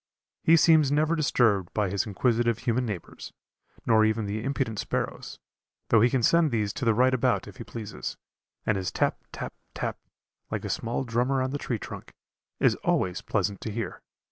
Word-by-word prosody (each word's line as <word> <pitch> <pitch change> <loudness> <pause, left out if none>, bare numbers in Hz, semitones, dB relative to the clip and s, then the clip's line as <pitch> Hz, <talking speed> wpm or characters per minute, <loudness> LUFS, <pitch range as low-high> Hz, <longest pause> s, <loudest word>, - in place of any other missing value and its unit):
He 165 +1 +6
seems 155 -4 +5
never 155 +3 +2
disturbed 115 - +2
by 105 -4 +1
his 100 +1 0
inquisitive 115 +2 +1
human 125 0 0
neighbors, 100 -6 -7 0.5
nor 110 -1 +5
even 110 0 +1
the 105 +2 -3
impudent 130 -5 -2
sparrows - - -3 0.5
though 115 - +5
he 120 - +5
can 125 -1 0
send 170 +4 +4
these 105 -5 -1
to 125 - -4
the 115 -2 +3
right 130 +2 +4
about 125 -6 +1
if 100 - -11
he - - -6
pleases 110 -3 -6 0.5
and 110 - +2
his 95 -1 -2
tap, - - 0
tap, - - -6 0.2
tap, - - -3 0.5
like - - -3
a - - -3
small 115 +3 -2
drummer 125 +3 0
on 130 - -2
the 145 - -3
tree 120 - -2
trunk, - - -9 0.4
is - - +4
always 90 -1 0
pleasant 100 -2 -1
to 110 - -4
hear. 110 -3 -4
115 Hz, 185 wpm, -27 LUFS, 105-130 Hz, 0.5 s, He